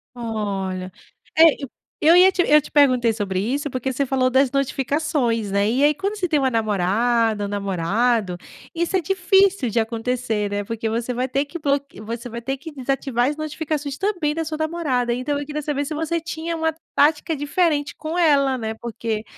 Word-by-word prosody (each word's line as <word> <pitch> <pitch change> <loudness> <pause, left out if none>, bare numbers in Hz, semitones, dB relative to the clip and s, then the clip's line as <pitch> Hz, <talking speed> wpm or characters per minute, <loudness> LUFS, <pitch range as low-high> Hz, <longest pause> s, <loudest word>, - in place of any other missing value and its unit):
Olha, 195 -5 -3 0.4
é, 320 - +7 0.2
eu 275 - -4 0.3
eu 325 +3 +6
ia 370 +1 +8
te 375 - +1
eu 300 0 +6
te - - -12
perguntei 255 -5 +4
sobre 200 -4 -2
isso, 275 +8 -1
porque 260 +1 -2
você 275 +2 -1
falou 255 -1 +1
das 260 0 +3
notificações, 275 -4 0
né, 200 +1 +1
e 250 +5 +1
aí 295 +1 +5
quando 395 +6 -3
você 370 -3 -1
tem 310 -2 +2
uma 270 -2 +2
namorada, 220 +1 +1
um - - -6
namorado, 200 +1 0 0.4
isso 340 +2 -1
é - - +2
difícil 385 -2 +2
de 230 +1 +1
acontecer, 225 -2 -2
né, 205 0 -2
porque 225 +1 -3
você 230 +2 -2
vai 250 +1 -1
ter 275 +3 0
que 295 +4 -8
bloque 280 - -2
você 230 +3 -6
vai 235 0 -6
ter 270 +3 -3
que 315 +4 -9
desativar 265 -2 -1
as 295 - -3
notificações 305 -2 -4
também 365 -7 0
da 325 +1 -2
sua 310 0 -4
namorada, 310 -7 -1
então 255 +4 -2
eu - - -4
queria 300 +1 -4
saber 290 -1 -2
se 295 - -5
você 320 +2 -1
tinha 330 +1 -4
uma 320 0 0 0.2
tática 300 +2 +2
diferente 290 0 0
com 315 +2 -5
ela, 280 -6 +3
né, 220 -2 -4
porque, 225 -1 -4
270 Hz, 195 wpm, -22 LUFS, 230-310 Hz, 0.4 s, ia